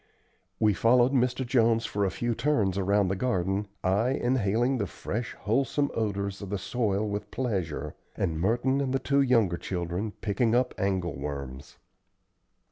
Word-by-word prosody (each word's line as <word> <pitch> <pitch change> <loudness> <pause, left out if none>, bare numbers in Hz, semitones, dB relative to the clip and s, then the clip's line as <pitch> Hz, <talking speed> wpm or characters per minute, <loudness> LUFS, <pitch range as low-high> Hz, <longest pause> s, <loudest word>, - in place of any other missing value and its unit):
We 105 -1 +4
followed 120 +5 +4
Mr. 125 0 +1
Jones 115 -2 +3
for 100 0 -1
a - - +1
few 120 +5 -2
turns 115 -6 +1
around 100 +1 +2
the 95 - 0
garden, 95 -2 -1 0.2
I 100 +6 +2
inhaling 120 0 +1
the 100 - -1
fresh 115 +6 -5
wholesome 135 +5 +1
odors 100 -2 -2
of 100 - -6
the 100 - -1
soil 105 0 -1
with 105 0 -4
pleasure, 100 - -3 0.2
and 80 -4 -1
Merton 120 +7 +1
and 135 -1 -1
the - - +4
two 140 +1 +2
younger 115 -10 +3
children 90 +4 -3
picking 115 +2 +1
up 125 0 +2
angle 95 -4 0
worms. 70 -1 -6
105 Hz, 155 wpm, -28 LUFS, 95-125 Hz, 0.2 s, We